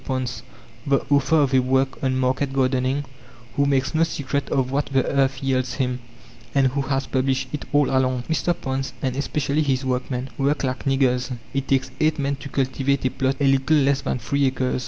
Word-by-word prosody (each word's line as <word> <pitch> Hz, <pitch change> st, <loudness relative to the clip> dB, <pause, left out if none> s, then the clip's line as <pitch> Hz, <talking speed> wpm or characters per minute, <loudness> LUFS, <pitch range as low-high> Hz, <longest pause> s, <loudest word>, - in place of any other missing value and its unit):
Ponce, 125 Hz, -4 st, -3 dB, 0.5 s
the 140 Hz, 0 st, +2 dB
author 145 Hz, +3 st, +3 dB
of 140 Hz, -2 st, +1 dB
a 130 Hz, -, +6 dB
work 130 Hz, +1 st, +1 dB
on 130 Hz, -1 st, +1 dB
market 130 Hz, +2 st, 0 dB
gardening, 130 Hz, +1 st, +1 dB, 0.5 s
who 140 Hz, 0 st, +2 dB
makes 135 Hz, 0 st, +1 dB
no 160 Hz, -, +2 dB
secret 140 Hz, -3 st, -2 dB
of 130 Hz, -1 st, 0 dB
what 140 Hz, +1 st, 0 dB
the 135 Hz, -2 st, +1 dB
earth 135 Hz, -1 st, +1 dB
yields 130 Hz, -2 st, 0 dB
him, 125 Hz, -1 st, -1 dB, 0.6 s
and 135 Hz, -1 st, +4 dB
who 140 Hz, +2 st, -1 dB
has 135 Hz, 0 st, -1 dB
published 130 Hz, 0 st, 0 dB
it 150 Hz, -, -4 dB
all 145 Hz, -2 st, +4 dB
along. 130 Hz, -2 st, +1 dB
M. 170 Hz, +2 st, +1 dB
Ponce, 135 Hz, -1 st, -3 dB
and 130 Hz, -2 st, 0 dB
especially 145 Hz, +1 st, 0 dB
his 135 Hz, -3 st, 0 dB
workmen, 125 Hz, 0 st, -2 dB
work 140 Hz, +2 st, +1 dB
like 130 Hz, 0 st, -2 dB
niggers. 130 Hz, -2 st, +1 dB, 0.2 s
It 135 Hz, 0 st, -2 dB
takes 130 Hz, -1 st, +1 dB
eight 155 Hz, 0 st, +2 dB
men 140 Hz, -1 st, -1 dB
to 140 Hz, -, -9 dB
cultivate 135 Hz, +1 st, 0 dB
a 130 Hz, -, +2 dB
plot 135 Hz, +1 st, 0 dB
a 140 Hz, -, +2 dB
little 135 Hz, +3 st, +3 dB
less 140 Hz, -1 st, +2 dB
than -, -, -2 dB
three 140 Hz, +4 st, 0 dB
acres 130 Hz, -1 st, -1 dB
(2. -, -, -3 dB
135 Hz, 200 wpm, -23 LUFS, 130-140 Hz, 0.6 s, a